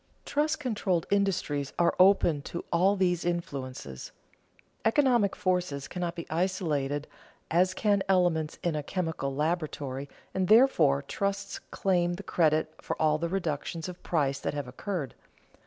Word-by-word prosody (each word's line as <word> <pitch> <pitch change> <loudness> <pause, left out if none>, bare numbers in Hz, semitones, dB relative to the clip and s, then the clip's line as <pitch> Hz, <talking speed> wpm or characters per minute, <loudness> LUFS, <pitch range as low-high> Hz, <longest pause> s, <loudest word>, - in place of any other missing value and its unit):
Trust 305 +2 0
controlled 205 - 0
industries 185 -8 0
are 170 -1 +3
open 185 -5 +5
to 170 - -5
all 185 +4 +4
these 180 -3 +1
influences. 135 - -4 0.7
Economic 235 -4 +3
forces 180 -7 -1
cannot 175 -1 -3
be 170 - -6
isolated 155 -5 -1 0.5
as 180 +3 +3
can 205 -2 +2
elements 175 -5 +2
in 170 -3 0
a 150 - -1
chemical 160 -4 -3
laboratory, 145 -3 -2 0.2
and, 190 -1 0
therefore, 170 - +5
trusts 200 +7 -3
claim 175 -2 +1
the 190 +3 -6
credit 155 -3 +1
for - - -4
all 155 -1 +3
the 170 0 -1
reductions 165 -2 -3
of 180 -1 -8
price 140 -5 0
that - - -3
have 145 -3 -3
occurred. 140 - -4
170 Hz, 140 wpm, -29 LUFS, 150-190 Hz, 0.7 s, open